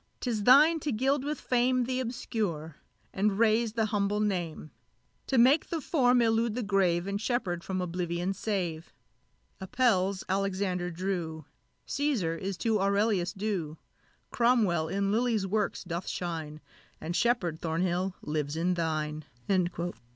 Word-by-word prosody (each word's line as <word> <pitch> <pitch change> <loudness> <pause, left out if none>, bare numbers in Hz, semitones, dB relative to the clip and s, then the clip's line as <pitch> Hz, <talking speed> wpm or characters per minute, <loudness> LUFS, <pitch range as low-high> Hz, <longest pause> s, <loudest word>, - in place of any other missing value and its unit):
'tis 220 -5 -2
thine 300 +6 +7
to 295 -1 -2
gild 265 +4 +1
with 295 0 -3
fame 250 0 +1
Th' 255 +1 -1
obscure, 205 - -3 0.4
and 195 0 +1
raise 225 0 +3
the 225 -1 +1
humble 205 0 +1
name; 175 -7 -2 0.6
To 265 - +1
make 265 +6 +5
the 335 - -2
form 250 -5 +3
elude 225 0 +1
the 250 - -2
grave, 185 -4 +1
And 200 +1 -3
Sheppard 215 -8 -1
from 185 -1 -3
oblivion 175 +1 -2
save! 180 -6 -3 0.7
Apelles 195 -3 +1
Alexander 190 -2 -1
drew 170 -3 -3 0.4
Cæsar 255 - 0
is 195 -1 -4
to 220 0 +1
Aurelius 200 -2 +1
due; 190 -7 -3 0.5
Cromwell 220 -10 +2
in 195 +3 0
Lilly's 225 -2 +1
works 205 +1 -1
doth 175 -1 -5
shine, 160 -3 -4 0.4
And 170 +2 -4
Sheppard, 180 -10 +1
Thornhill, 180 +3 -1
lives 150 -1 -2
in 175 +3 +1
thine!" 155 -3 -2
195 Hz, 135 wpm, -29 LUFS, 175-235 Hz, 0.7 s, thine